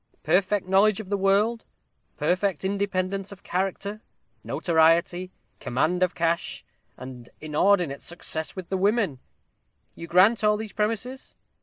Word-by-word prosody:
perfect 195 +1 +1
knowledge 195 +2 +4
of 205 -4 -8
the 205 - +1
world 205 +4 +2 0.5
perfect 185 -1 0
independence 195 0 -2
of 200 -1 -12
character 195 +3 -3 0.4
notoriety 170 +2 +2 0.3
command 160 +9 0
of 180 -1 +1
cash 170 0 -1 0.3
and 125 -2 -10
inordinate 155 0 +1
success 160 -2 -3
with 185 -3 -7
the 190 - -1
women. 200 - +1 0.7
You 165 - -9
grant 200 +7 +4
all 210 0 +3
these 220 -1 -7
premises? 225 +5 -3
190 Hz, 125 wpm, -25 LUFS, 170-205 Hz, 0.7 s, knowledge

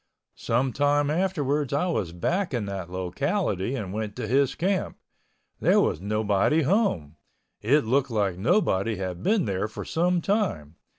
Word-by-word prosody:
Some 125 +2 0
time 145 0 +2
afterwards 150 -6 0
I 145 +5 +1
was 105 - -1
back 170 - -1
in 115 -4 -2
that 95 -3 -5
locality 95 - -1
and 100 -7 -5
went 105 -1 -4
to - - -4
his 135 +1 +2
camp. 190 +1 -1 0.6
There - - +4
was 80 - +1
nobody 105 +8 +1
home. 120 - 0 0.4
It 135 +5 +3
looked 130 +4 +1
like 100 -5 0
nobody 110 - +1
had 90 -2 -5
been 210 - +2
there 100 0 -1
for 110 - -8
some 175 +2 +1
time. 165 - -1
120 Hz, 155 wpm, -26 LUFS, 95-160 Hz, 0.6 s, There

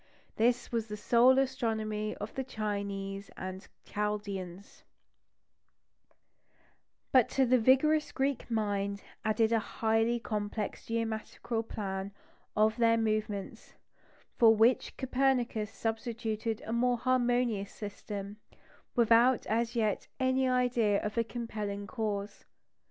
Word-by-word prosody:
This 240 +2 +1
was 230 -2 -1
the 210 -1 -5
sole 245 +4 +5
astronomy 220 -5 -1
of 205 +1 -7
the 265 - -2
Chinese 200 -4 -4
and 185 +1 -6 0.2
Chaldeans; 200 -3 -4 2.3
but 255 -4 +5
to 270 - +2
it 250 - 0
the 255 - +6
vigorous 300 +6 +4
Greek 270 -1 -1
mind 200 -3 -1 0.2
added 220 +1 +2
a 230 - +4
highly 225 +2 +1
complex 210 -1 -4
geometrical 225 0 -2
plan 195 -3 -4 0.4
of 215 +1 +3
their 230 -1 +4
movements, 215 -3 -2 0.6
for 225 -1 +7
which 225 +4 +3
Copernicus 255 -5 +1
substituted 225 -1 -3
a 225 - -3
more 245 +1 +2
harmonious 245 -4 +1
system, 205 -1 -7 0.6
without 235 +1 +4
as 230 +2 0
yet 215 -3 0
any 260 0 +2
idea 245 -5 +2
of 210 0 -3
a 230 - +2
compelling 215 -4 -5
cause. 205 -2 -4
225 Hz, 115 wpm, -31 LUFS, 210-240 Hz, 2.3 s, for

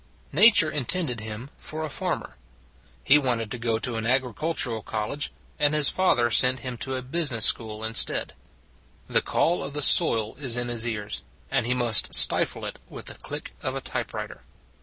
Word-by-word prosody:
Nature 210 -8 +5
intended 145 -2 -1
him 110 +5 -8
for 155 0 -6
a - - -5
farmer: 140 - -5 0.7
he 145 +2 +5
wanted 120 -6 -2
to 125 - -5
go 115 -1 -1
to 115 +1 -4
an 110 0 -3
agricultural 130 -1 -1
college, 110 +8 -5 0.3
and 150 0 +2
his 150 -2 +6
father 120 -11 +3
sent 125 +2 +4
him 125 -1 -6
to 130 +3 -5
a 130 - -5
business 135 -4 +2
school 110 -1 +2
instead. 110 0 +1 0.7
The - - +2
call 175 +2 -1
of 140 - -6
the 150 - -2
soil 110 -3 +4
is 130 -4 -1
in 120 0 -3
his 120 -1 +1
ears, 105 -3 -5 0.3
and 135 -3 -1
he 125 - 0
must 120 -3 +3
stifle - - +3
it - - -7
with - - -10
the - - -6
click - - -8
of - - -4
a - - -5
typewriter. - - -6
125 Hz, 180 wpm, -24 LUFS, 115-145 Hz, 0.7 s, his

